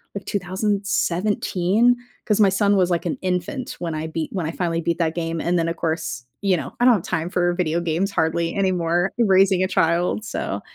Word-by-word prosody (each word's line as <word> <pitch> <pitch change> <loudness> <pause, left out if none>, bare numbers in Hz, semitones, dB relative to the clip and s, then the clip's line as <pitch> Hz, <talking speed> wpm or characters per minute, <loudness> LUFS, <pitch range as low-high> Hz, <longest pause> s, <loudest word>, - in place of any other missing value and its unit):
like 200 - -5
2017, 200 +2 +1 0.3
'cause 210 -2 +1
my 200 - +6
son 200 +1 +2
was 185 -2 +3
like 170 - 0
an 280 - -2
infant 185 +8 -3
when 165 -2 -3
I 155 +1 -3
beat 160 0 -3
when 185 -5 -2
I 160 - -2
finally 165 -1 -1
beat 170 0 -1
that 160 -1 0
game. 165 -1 -2
And 175 +1 +1
then 165 - 0
of 165 - -3
course, 160 -7 -3 0.2
you 195 -3 +2
know, - - -6
I 245 - +3
don't 250 -2 +7
have 185 - -3
time 165 -1 -2
for 175 -1 +1
video 170 -2 0
games 170 +3 -1
hardly 165 -1 0
anymore, 180 -2 +1
raising 195 -3 +4
a - - +1
child, 175 +4 +1
so - - -3
180 Hz, 205 wpm, -22 LUFS, 165-195 Hz, 0.3 s, don't